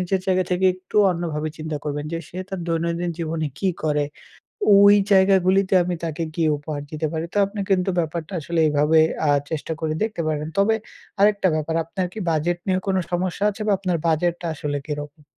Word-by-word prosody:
নিজের 185 +1 0
জায়গা 185 -1 +2
থেকে 185 +1 +2
একটু 185 +2 -9 0.2
অন্যভাবে 160 -3 -3
চিন্তা 155 -1 -4
করবেন 145 0 -3
যে 165 - -1
সে 180 - -8
তার 190 -1 -5
দৈনন্দিন 170 +1 -1
জীবনে 160 -1 -2
কী 195 - +1 0.2
করে, 150 -1 +1 0.7
ওই 200 +1 +8 0.2
জায়গাগুলিতে 190 0 +4
আমি 175 0 -2
তাকে 165 0 -3
কী 165 - 0
উপহার 145 0 -5
দিতে 155 0 -2
পারি। 160 0 -2
তো - - -2
আপনি 200 +2 -7
কিন্তু 185 0 +2
ব্যাপারটা 165 +2 -3
আসলে 170 +3 -2
এইভাবে 150 +2 +3 0.3
আ - - +5 0.2
চেষ্টা 160 +1 -3
করে 155 -1 -1
দেখতে 220 -5 -2
পারেন। 150 0 -2
তবে 205 +3 +4 0.4
আরেকটা 200 -1 +4
ব্যাপার, 155 +1 -2
আপনার 185 +3 -3
কি 220 - -6
budget 165 +3 0
নিয়ে 185 -1 +2
কোনো 190 -1 +2
সমস্যা 180 +2 -1
আছে 210 - -10
বা - - +3
আপনার 185 -3 0
budget 165 +2 +2
টা 175 - -3
আসলে 145 -1 -3
কিরকম? 150 0 -6
170 Hz, 190 wpm, -22 LUFS, 155-190 Hz, 0.7 s, ওই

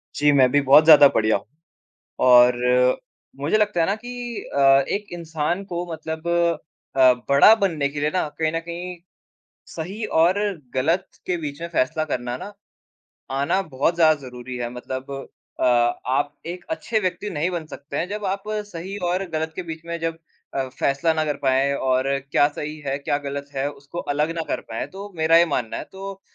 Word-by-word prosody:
जी, 145 0 +4
मैं 130 -3 +5
भी 145 - +4
बहुत 140 +3 +7
ज़्यादा 150 -3 +9
बढ़िया 110 0 +3
हूँ। 100 - -14 0.8
और 125 0 +7 0.9
मुझे 150 +9 +2
लगता 210 -5 +1
है 165 - +3
ना 200 - +1
कि 240 +1 -6
अ, - - +2 0.3
एक 205 +1 -2
इंसान 165 +2 -2
को 175 -2 -4
मतलब 160 +1 -5 0.7
अ, 130 -1 +7 0.2
बड़ा 140 +11 +7
बनने 165 -10 0
के 145 +1 -5
लिए 150 +1 +1
ना 180 -4 +1
कहीं 160 -1 +1
न 165 - -1
कहीं 175 +2 -6 0.7
सही 190 +7 -6 0.2
और 175 +5 +4 0.4
ग़लत 160 +8 +1 0.2
के 180 - -1
बीच 150 -1 -6
में 170 - -3
फ़ैसला 155 0 0
करना 125 -4 -3
ना, 205 +9 -8 0.8
आना 140 +8 +1
बहुत 150 0 0
ज़्यादा 160 -2 +5
ज़रूरी 125 -1 -8
है। 120 -1 -3
मतलब 130 +2 -6 0.5
अ, - - +2
आप 125 +3 +1
एक 175 +1 -6
अच्छे 235 -8 -1
व्यक्ति 185 +2 -2
नहीं 165 0 -1
बन 170 -3 -4
सकते 140 -2 -8
हैं। 170 - -1
जब 210 +1 -5
आप 195 +1 -2
सही 205 -3 -5
और 185 +2 0
ग़लत 160 0 -2
के 185 - -3
बीच 160 +1 -7
में 170 0 -4
जब 165 0 -2 0.4
अ, 135 -1 -1
फ़ैसला 140 +5 0
ना 160 -1 0
कर 150 -2 -1
पाए 135 +1 +2
और 130 -1 +1 0.2
क्या 145 - +4
सही 150 +1 -6
है 135 0 0
क्या 145 0 -1
ग़लत 140 0 -5
है 135 +1 -1
उसको 140 +3 -10 0.2
अलग 150 +3 0
ना 165 - -1
कर - - -1
पाए, 115 0 -5
तो 200 +2 -9
मेरा 160 +1 +4
ये 170 - +5
मानना 125 -7 -2
है। - - -5
तो 195 0 -8
155 Hz, 190 wpm, -23 LUFS, 140-180 Hz, 0.9 s, ज़्यादा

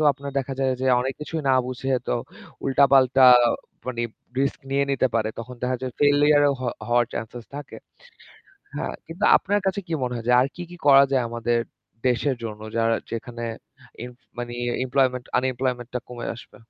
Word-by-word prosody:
তো - - +2
আপনার 140 +1 -8
দেখা 135 0 -3
যায় 135 -1 +2
যে - - +1
অনেক 130 +1 -2
কিছুই 155 +1 -4
না 130 - +5
বুঝে 130 +1 -3 0.2
তো - - +2 0.5
উল্টাপাল্টা 135 -1 +5 0.6
মানে 120 -2 -2 0.4
রিস্ক 140 +3 -1
নিয়ে 140 +1 +2
নিতে 135 -1 +2
পারে। 110 -1 +1
তখন 125 +2 -8
দেখা 125 0 0
যায় 130 -2 -3
ফেইলিউর 145 0 +5 0.2
হ - - -5 0.3
হওয়ার 120 0 +3
চান্স 110 -1 -5 0.2
থাকে। 145 - -8 1.0
হ্যাঁ, - - -3
কিন্তু 170 +6 -4
আপনার 205 +1 0
কাছে 190 +1 0
কি 165 - -6
মনে 125 -1 -1
হয় 115 -1 -7
যে - - +5
আর 130 - +2
কি, 180 - -5
কি 175 - -10
করা 140 -1 +8
যায় 130 -2 +2
আমাদের 120 0 0 0.5
দেশের 130 +2 +1
জন্য 105 -2 -6 0.2
যারা 115 0 +2 0.2
যেখানে 120 +1 -5 0.6
ইম 125 - -8 0.3
মানে 120 0 -4 0.3
এমপ্লয়মেন্ট 125 -1 +1
আনএমপ্লয়মেন্ট 125 -1 -1
টা 125 - -1
কমে 120 -1 -6
আসবে? 120 - -14
130 Hz, 175 wpm, -24 LUFS, 120-140 Hz, 1.0 s, করা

